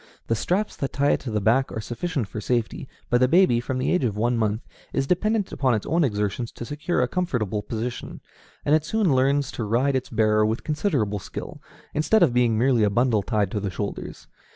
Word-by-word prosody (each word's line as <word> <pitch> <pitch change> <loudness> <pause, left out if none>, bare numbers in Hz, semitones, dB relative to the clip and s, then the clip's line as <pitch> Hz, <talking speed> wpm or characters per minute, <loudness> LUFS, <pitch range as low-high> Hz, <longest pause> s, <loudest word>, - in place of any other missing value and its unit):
The 115 - 0
straps 190 - -1
that 135 - -3
tie 140 0 +2
it - - +2
to 130 - -6
the 105 -1 0
back 120 +6 +2
are - - -4
sufficient 120 - -3
for 105 - -6
safety; 120 +3 -1 0.2
but 120 - +4
the 130 - +4
baby, 165 -6 +4
from 130 +1 -3
the 130 - 0
age 180 - +2
of 105 -4 -1
one 120 +3 +1
month, 110 -1 -1 0.3
is 135 - +1
dependent 205 +5 0
upon 130 -4 +1
its 105 - -3
own 165 +2 +2
exertions 105 -1 -1
to 120 - -7
secure 150 +6 -1
a - - +1
comfortable 120 - -1
position, 115 +3 -5 0.5
and 145 - +3
it 155 -1 +4
soon 200 -2 +1
learns 135 +1 +2
to 120 - -4
ride 125 +6 +1
its 130 - -2
bearer 110 -1 +3
with 110 +2 -1
considerable 145 - 0
skill, - - -8 0.3
instead 175 +7 +3
of 140 -8 +3
being 120 -3 +3
merely 125 0 +3
a 105 - +4
bundle 115 0 +2
tied 105 -2 0
to 105 - -1
the 100 -1 -2
shoulders. 100 +2 -5
125 Hz, 220 wpm, -24 LUFS, 110-145 Hz, 0.5 s, but